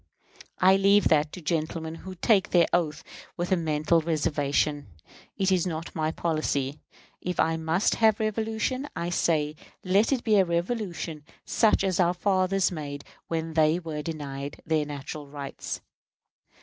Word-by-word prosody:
I 190 +1 +5
leave 200 +1 +4
that 150 -1 +3
to 180 - -7
gentlemen 160 0 -2
who 185 +3 -9
take 195 +2 +3
the 175 -2 +4
oath 155 -3 0 0.3
with 175 +2 -2
a - - +6
mental 160 0 +1
reservation. 145 -2 0 0.5
It 190 0 +1
is 185 -1 +2
not 165 -1 -5
my 155 -1 0
policy. 155 -4 -1 0.4
If 180 -1 -3
I 165 0 +3
must 160 +4 +1
have 220 -1 +5
revolution, 220 +5 -1
I 170 +1 -2
say 155 -3 +1 0.3
let 195 +6 +3
it 260 -3 +1
be 215 -2 +3
a 195 - +6
revolution 170 -3 -3 0.2
such 215 -3 +3
as 190 -2 0
our 175 0 +3
fathers 190 0 +2
made 145 -4 -6 0.2
when 165 -1 -3
they 155 +1 +4
were 160 -4 -5
denied 145 -3 -5
their 155 -1 +1
natural 145 +1 -7
rights. 140 -1 -6
165 Hz, 150 wpm, -27 LUFS, 155-190 Hz, 0.5 s, a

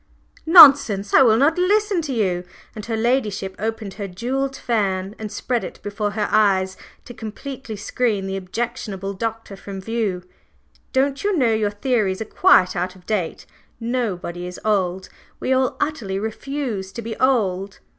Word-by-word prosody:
"Nonsense! 275 - +8
I - - +7
will 225 -4 +5
not 305 +7 +3
listen 405 0 +2
to 300 -3 -5
you!" 190 -7 0 0.3
and 215 - -7
her 225 -1 -1
ladyship 220 -5 0
opened 220 -2 -4
her 200 -2 -5
jewelled 260 +8 -3
fan 200 -6 -1
and 215 -2 -6
spread 235 +3 -2
it - - -8
before 205 +1 -2
her 210 -1 -1
eyes 190 -3 +3 0.3
to 245 - -9
completely 230 +2 -7
screen 210 -1 -1
the 195 0 -3
objectionable 195 0 -4
Doctor 225 0 -4
from 195 0 -8
view. 200 -3 -2 0.7
"Don't 275 +1 0
you 405 -3 +1
know 240 -6 +3
your 215 -1 +1
theories 205 -3 0
are 220 - -3
quite 185 -3 +4
out 180 +1 -2
of 180 -1 -18
date? 195 -7 -2 0.3
Nobody 200 -8 -3
is 180 - -8
old, 190 -3 0 0.3
we 260 - 0
all 260 0 +1
utterly 220 -11 -2
refuse 220 -2 -4
to 235 - -6
be 225 0 -5
old! 200 -7 +1
220 Hz, 160 wpm, -21 LUFS, 195-250 Hz, 0.7 s, Nonsense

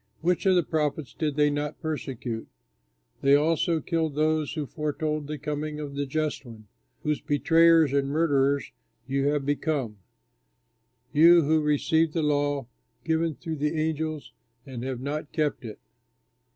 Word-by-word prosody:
Which 180 +3 +1
of 190 - +5
the 175 - +3
prophets 150 -3 -2
did 150 -3 -2
they 150 0 +3
not 145 0 -3
persecute? 130 -7 -4 0.7
They 140 +1 +5
also 160 +2 +2
killed 160 -2 -1
those 155 -1 +1
who 155 -3 -3
foretold 150 0 -3
the 150 0 -4
coming 150 +1 -4
of 145 -2 -6
the 140 0 -3
Just 155 0 -2
One, 110 -4 -13 0.4
whose 150 -1 -1
betrayers 165 0 +4
and 140 -1 +1
murderers 140 -2 +1 0.4
you 135 +1 0
have 145 -1 0
become 140 -7 -1 1.1
you 170 +2 +7
who 155 +2 +2
received 155 +2 +1
the 165 - 0
law 145 -2 0 0.4
given 160 -1 0
through 160 -1 -6
angels, 155 0 -2 0.3
and 130 -3 -7
have 130 -1 -4
not 150 +2 -4
kept 150 -3 -1
it!" 110 -3 -7
150 Hz, 145 wpm, -26 LUFS, 140-160 Hz, 1.1 s, you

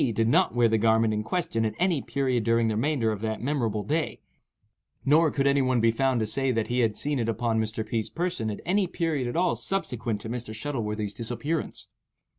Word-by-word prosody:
did 115 +1 +2
not 115 - +3
wear 120 -1 +5
the 110 0 +2
garment 110 0 +3
in 105 - -1
question 115 -2 -1
at 110 - -1
any 175 -5 +1
period 130 -1 0
during 115 0 +2
the 110 - 0
remainder 120 -1 +1
of 105 -2 -4
that 110 -1 -2
memorable 120 -6 -1
day, 155 +5 -1 0.9
nor 155 +3 +5
could 140 -1 -1
any 140 0 +4
one 130 -2 +2
be 115 0 +4
found 130 +1 +1
to 110 - 0
say 130 +5 0
that 115 -3 -1
he 125 +1 0
had 110 -3 +1
seen 145 -2 -1
it 115 -1 0
upon 115 0 0
Mr. 110 0 -3
P.'s 115 -3 -2
person 170 -10 -2
at 105 - -5
any 190 +2 +2
period 160 -7 -1
at 120 - -4
all 175 0 +2
subsequent 120 - -2
to 110 - -7
Mr. 115 -1 -5
Shuttleworthy's 110 -5 -3
disappearance. 125 +7 -3
120 Hz, 215 wpm, -27 LUFS, 110-140 Hz, 0.9 s, wear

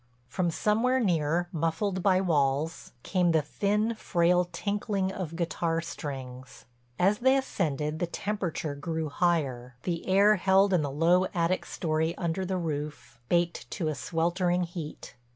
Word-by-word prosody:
From 175 +6 -1
somewhere 225 +9 +2
near, 175 - +1
muffled 175 +3 -1
by 185 0 +3
walls, 150 -2 0
came 180 -3 +2
the 160 -2 +3
thin, 210 +8 0
frail 180 -4 +2
tinkling 200 -2 -1
of 180 -4 -5
guitar 165 -1 -1
strings. 130 -6 -7 0.3
As 195 +4 +3
they 260 +2 +4
ascended 155 - -2
the 175 - 0
temperature 175 -5 -3
grew 160 +2 -3
higher, 135 -8 0
the 170 -2 -3
air 200 +3 +5
held 190 +2 +4
in 175 - +4
the 145 - -2
low 170 +6 +3
attic 170 +2 0
story 160 0 -1
under 170 +1 -1
the 185 0 -1
roof, 150 -7 -5
baked 175 0 0
to 165 -6 -2
a - - -1
sweltering 175 +4 0
heat. 170 -3 -7
170 Hz, 145 wpm, -28 LUFS, 155-190 Hz, 0.3 s, air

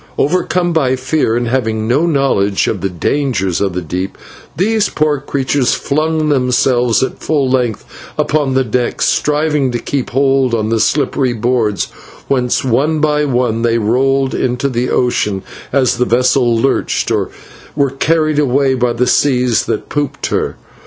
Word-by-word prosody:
Overcome 175 +2 +1
by 135 -5 +2
fear, 130 -2 0
and 120 0 -1
having 110 -3 -1
no 140 +8 +2
knowledge 135 - +1
of - - -2
the 95 - -1
dangers 95 - -1
of 100 -3 0
the 90 0 -3
deep, 90 +4 -4 0.4
these 215 +3 +1
poor 150 -2 0
creatures 135 -1 0
flung 155 +1 -1
themselves 125 -3 +2
at - - -4
full 145 -4 0
length 125 -4 -1 0.3
upon 145 -3 0
the 130 - +3
deck, 125 +1 -1
striving 150 -2 +1
to 120 - -1
keep 130 +2 -3
a - - -17
hold 135 -2 +2
of 110 -1 -1
the 115 - +1
slippery 135 -1 +1
boards, 115 -3 0 0.4
whence 125 -3 0
one 135 +6 +1
by 150 -1 +1
one 120 -4 0
they 115 0 +2
rolled 135 +4 +1
into 125 +2 -1
the 125 0 -1
ocean 105 -6 0 0.3
as 130 -3 +2
the 125 - +3
vessel 125 0 +2
lurched, 135 +4 0
or - - 0 0.5
were 140 -2 +1
carried 155 +2 +1
away 135 -1 +2
by 125 -2 0
the 120 +2 0
seas 125 -4 +2
that - - -3
pooped 145 -1 -2
her. - - -1
130 Hz, 160 wpm, -15 LUFS, 120-145 Hz, 0.5 s, the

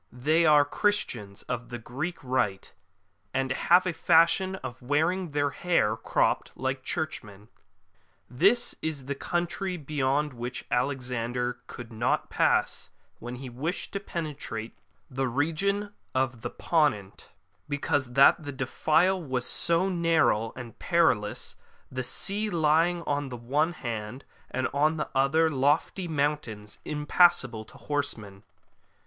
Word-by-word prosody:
They 155 +7 +2
are 150 -1 +6
Christians 125 - -1
of 120 -2 -5
the 120 - -5
Greek 135 +10 -4
Rite, 105 -8 -1 0.6
and 135 0 0
have 175 +7 +4
a 180 - 0
fashion 170 +4 +3
of 125 -9 -8
wearing 160 +7 +1
their 145 -1 0
hair 155 -13 +1
cropped, - - 0
like 130 0 -2
Churchmen.'' 105 -10 -4 0.8
This 195 - +2
is 150 -4 -3
the 140 - -2
country 175 +5 -2
beyond 145 -1 0
which 120 +1 -5
Alexander 125 -1 -1
could 120 -1 -9
not 115 +2 0
pass - - +1 0.3
when 120 +1 -6
he 130 +1 -8
wished 140 +9 -4
to 200 - -1
penetrate 150 - -5
to - - -38 0.3
the 135 +1 -1
region 195 - 0 0.2
of 130 -3 0
the - - -3
Ponent, 125 - 0 0.4
because 145 -3 -1
that 140 +5 +6
the 145 - -5
defile 155 +7 +1
was 130 -4 -2
so 170 +3 +2
narrow 165 - +2
and 125 -2 -9
perilous, 115 -12 +1 0.4
the 130 0 -3
sea 205 - -2
lying 170 0 +2
on 145 -2 -1
the 125 - -6
one 145 +8 0
hand, 115 -2 -5 0.2
and 130 0 -1
on 155 +3 +2
the - - -3
other 155 +4 +3
lofty 145 +6 +1
mountains 140 -9 -2
impassable 150 -6 +3
to - - -16
horsemen. 115 -10 -4
140 Hz, 130 wpm, -28 LUFS, 125-165 Hz, 0.8 s, are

